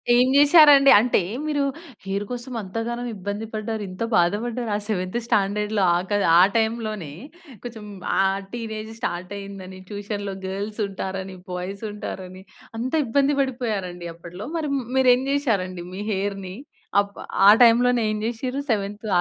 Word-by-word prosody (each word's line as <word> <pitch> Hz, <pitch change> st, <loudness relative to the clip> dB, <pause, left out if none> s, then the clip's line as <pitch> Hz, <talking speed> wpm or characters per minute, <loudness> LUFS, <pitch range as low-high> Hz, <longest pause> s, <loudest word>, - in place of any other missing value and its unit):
ఏం 250 Hz, +1 st, +5 dB
చేసారండి. 290 Hz, -1 st, +8 dB
అంటే, 235 Hz, -3 st, +2 dB, 0.2 s
మీరు 295 Hz, -2 st, 0 dB, 0.4 s
హెయిర్ 200 Hz, +1 st, -2 dB
కోసం 245 Hz, +1 st, -6 dB
అంతగనం 230 Hz, +5 st, -4 dB
ఇబ్బంది 205 Hz, +3 st, -4 dB
పడ్డారు, 215 Hz, 0 st, -3 dB
ఇంత 185 Hz, +5 st, -5 dB
బాధపడ్డారు. 225 Hz, +7 st, 0 dB
ఆ -, -, +1 dB
సెవెంత్ 185 Hz, +1 st, -1 dB
స్టాండర్డ్‌లో 205 Hz, 0 st, +1 dB
ఆకదు 200 Hz, +3 st, 0 dB
ఆ -, -, +8 dB, 0.2 s
టైమ్‌లోనే, 220 Hz, -7 st, -2 dB, 0.5 s
కొంచెం 230 Hz, -3 st, -8 dB, 0.3 s
ఆ! -, -, +6 dB, 0.3 s
టీనేజ్ 220 Hz, -2 st, -5 dB
స్టార్ట్ 180 Hz, -4 st, -4 dB
అయిందని, 190 Hz, -1 st, -9 dB
ట్యూషన్‌లో 205 Hz, -1 st, -5 dB
గర్ల్స్ 205 Hz, +3 st, -5 dB
ఉంటారని, 190 Hz, 0 st, -5 dB, 0.2 s
బాయ్స్ 185 Hz, +4 st, -5 dB
ఉంటారని, 190 Hz, -2 st, -7 dB, 0.4 s
అంత 255 Hz, +5 st, -3 dB
ఇబ్బంది 280 Hz, +4 st, +2 dB
పడిపోయారండి 210 Hz, -10 st, -3 dB
అప్పట్లో. 175 Hz, +5 st, -9 dB
మరి 310 Hz, -2 st, -2 dB, 0.3 s
మీరు 260 Hz, -1 st, +6 dB
ఏం 255 Hz, -, -3 dB
చేసారండి 195 Hz, -11 st, -1 dB
మీ 195 Hz, -, -5 dB
హెయిర్‌ని 195 Hz, -1 st, -3 dB, 0.5 s
అప్ 200 Hz, 0 st, -9 dB, 0.3 s
ఆ -, -, +11 dB
టైమ్‌లోనే 240 Hz, +1 st, +5 dB
ఏం 215 Hz, -, -2 dB
చేసిర్రు 250 Hz, +4 st, -3 dB
సెవెంత్ 205 Hz, +1 st, -2 dB
210 Hz, 135 wpm, -23 LUFS, 190-240 Hz, 0.5 s, ఆ